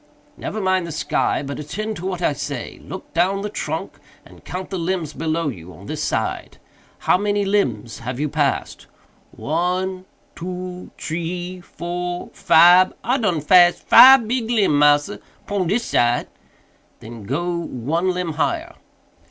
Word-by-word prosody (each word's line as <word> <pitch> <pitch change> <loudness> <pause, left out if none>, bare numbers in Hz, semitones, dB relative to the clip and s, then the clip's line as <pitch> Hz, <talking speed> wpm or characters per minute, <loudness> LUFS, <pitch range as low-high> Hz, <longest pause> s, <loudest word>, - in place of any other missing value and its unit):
"Never 220 - -5
mind 185 -3 +1
the - - -6
sky, 150 - -1
but 140 0 -6
attend 215 +9 -4
to 180 - -5
what 180 -2 -4
I 150 - +2
say. 140 -3 -6
Look 190 - -9
down 190 +4 +1
the 210 - -4
trunk - - -5 0.3
and - - -17
count 185 +2 -6
the 190 - -3
limbs 165 -3 -2
below 160 -1 -1
you 90 -8 -9
on 75 - -14
this - - -4
side. - - -3 0.4
How 180 - +2
many 205 0 0
limbs 125 - -1
have 125 +2 -5
you 150 - 0
passed?" 145 -1 -2 0.4
"One, 185 +4 -2 0.3
two, 180 +1 -6
tree, 175 +3 -4
four, 175 +1 -5
fibe—I 185 +9 +4
done 180 -10 0
pass 175 +2 +6
fibe 260 -3 +8
big 235 -1 -1
limb, 200 -11 +2
massa, 145 -7 +3 0.3
pon 200 -3 -1
dis 225 +6 0
side." 120 0 +1 0.7
"Then 115 -2 -10
go 170 - -2
one 165 +4 -2
limb 180 -3 -2
higher." 335 - -2
175 Hz, 150 wpm, -21 LUFS, 150-190 Hz, 0.7 s, fibe